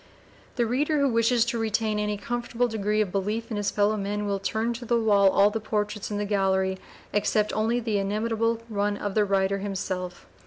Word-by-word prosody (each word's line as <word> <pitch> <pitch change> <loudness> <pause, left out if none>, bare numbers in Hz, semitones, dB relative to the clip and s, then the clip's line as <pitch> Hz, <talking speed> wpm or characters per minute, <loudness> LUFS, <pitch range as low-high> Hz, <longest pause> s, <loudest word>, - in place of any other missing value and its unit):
The 240 - +1
reader 290 +6 +1
who 280 - +3
wishes 230 0 +3
to 235 0 -2
retain 220 -1 0
any 210 0 -1
comfortable 240 +2 -1
degree 215 -1 0
of 200 -4 -1
belief 210 +5 -2
in 215 - -2
his 205 -1 0
fellow 205 +1 +2
men 205 +1 -2
will 200 -1 -1
turn 220 +4 -1
to 235 +1 -7
the 235 0 +1
wall 205 -3 +4
all 200 +2 +4
the 225 - -2
portraits 210 -1 -2
in 205 - -3
the 205 - -1
gallery 190 -2 +1 0.3
except 210 +1 +1
only 225 +3 +1
the 220 -3 -1
inimitable 225 +3 0
one 205 -2 -1
of 205 -1 -3
the 210 0 +3
writer 195 0 +1
himself. 185 -2 -4
210 Hz, 200 wpm, -26 LUFS, 200-230 Hz, 0.3 s, wall